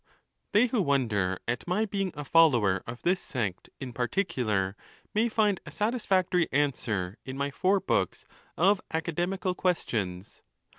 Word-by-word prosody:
They 215 Hz, +4 st, +5 dB
who 235 Hz, -3 st, +1 dB
wonder 110 Hz, -, +1 dB
at 120 Hz, +6 st, -2 dB
my 195 Hz, +5 st, +1 dB
being 195 Hz, -3 st, -2 dB
a 150 Hz, -, -6 dB
follower 120 Hz, -, +4 dB
of 120 Hz, +1 st, -7 dB
this 180 Hz, +2 st, +2 dB
sect 105 Hz, -8 st, -3 dB
in 130 Hz, -2 st, -6 dB
particular 115 Hz, -, 0 dB, 0.4 s
may 225 Hz, +3 st, +2 dB
find 210 Hz, -4 st, +2 dB
a -, -, -9 dB
satisfactory 190 Hz, -6 st, +1 dB
answer 115 Hz, -9 st, -1 dB
in 130 Hz, 0 st, -6 dB
my 140 Hz, 0 st, -1 dB
four 190 Hz, +6 st, +2 dB
books 95 Hz, -, -1 dB, 0.3 s
of 195 Hz, +3 st, +4 dB
Academical 175 Hz, +4 st, -1 dB
Questions. 105 Hz, -, -2 dB
150 Hz, 140 wpm, -28 LUFS, 115-190 Hz, 0.4 s, They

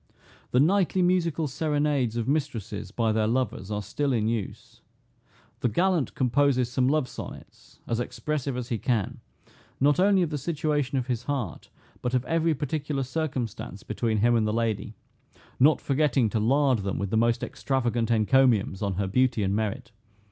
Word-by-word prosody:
The 125 Hz, -, +2 dB
nightly 185 Hz, +4 st, +3 dB
musical 170 Hz, -3 st, +1 dB
serenades 145 Hz, -4 st, 0 dB
of 115 Hz, -, -2 dB
mistresses 120 Hz, -9 st, -2 dB
by 115 Hz, +2 st, 0 dB
their 110 Hz, 0 st, +1 dB
lovers 120 Hz, -5 st, -1 dB
are 105 Hz, -1 st, -2 dB
still 135 Hz, +7 st, -1 dB
in 110 Hz, -2 st, +1 dB
use. 115 Hz, -3 st, -4 dB, 0.8 s
The 120 Hz, -, +1 dB
gallant 175 Hz, -, +1 dB
composes 130 Hz, -1 st, +2 dB
some 125 Hz, 0 st, +1 dB
love 145 Hz, -1 st, +2 dB
sonnets, -, -, -11 dB
as 115 Hz, -, -1 dB
expressive 140 Hz, +1 st, -3 dB
as 125 Hz, 0 st, -5 dB
he 115 Hz, -4 st, -1 dB
can, 115 Hz, -7 st, -1 dB, 0.6 s
not 145 Hz, +4 st, +3 dB
only 195 Hz, -1 st, +4 dB
of 165 Hz, -, -2 dB
the 150 Hz, -, -2 dB
situation 145 Hz, -2 st, -1 dB
of 125 Hz, -, -1 dB
his 125 Hz, -1 st, -3 dB
heart, 130 Hz, -, -4 dB, 0.3 s
but 125 Hz, +1 st, -1 dB
of 125 Hz, 0 st, 0 dB
every 165 Hz, +2 st, +1 dB
particular 145 Hz, 0 st, -2 dB
circumstance 130 Hz, -5 st, -4 dB
between 110 Hz, -2 st, -1 dB
him 120 Hz, +3 st, +3 dB
and 110 Hz, -2 st, +2 dB
the -, -, 0 dB
lady, 110 Hz, -2 st, -1 dB, 0.6 s
not 150 Hz, +4 st, +5 dB
forgetting 135 Hz, -5 st, +1 dB
to 110 Hz, -, 0 dB
lard 130 Hz, +2 st, +3 dB
them 100 Hz, -1 st, -3 dB
with 100 Hz, -1 st, -3 dB
the -, -, +1 dB
most 115 Hz, +1 st, +2 dB
extravagant 120 Hz, -4 st, -1 dB
encomiums 115 Hz, -3 st, +3 dB
on 100 Hz, -2 st, -1 dB
her 100 Hz, +2 st, -1 dB
beauty 120 Hz, +2 st, +1 dB
and 100 Hz, +1 st, 0 dB
merit. 110 Hz, +4 st, -3 dB
125 Hz, 170 wpm, -26 LUFS, 110-145 Hz, 0.8 s, not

